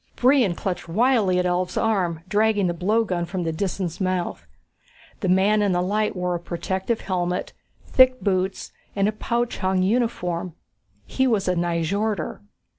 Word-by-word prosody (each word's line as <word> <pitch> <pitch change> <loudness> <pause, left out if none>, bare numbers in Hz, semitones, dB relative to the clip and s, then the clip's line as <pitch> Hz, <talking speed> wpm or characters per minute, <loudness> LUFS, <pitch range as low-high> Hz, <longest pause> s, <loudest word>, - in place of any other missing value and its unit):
Brion 250 -8 +3
clutched 180 -2 -4
wildly 215 -1 +3
at 180 - +1
Ulv's 180 0 -1
arm, 180 -7 0
dragging 210 0 +2
the 175 - 0
blowgun 185 0 0
from 180 0 -3
the 165 -1 -2
Disan's 185 0 -3
mouth. 185 -2 -2 0.7
The 190 - -1
man 200 +3 +3
in 200 -2 +2
the 175 - +1
light 210 +3 0
wore 180 -1 -1
a 175 - -2
protective 190 +6 -3
helmet, 180 -1 -2 0.3
thick 255 -1 +5
boots 190 -2 -1 0.2
and 200 0 +2
a - - +1
pouch 235 +2 -2
hung 185 -1 +1
uniform. 185 -6 -1 0.5
He 265 0 0
was 215 -6 +1
a 180 - +3
Nyjorder. 175 +2 -1
190 Hz, 155 wpm, -23 LUFS, 180-215 Hz, 0.7 s, thick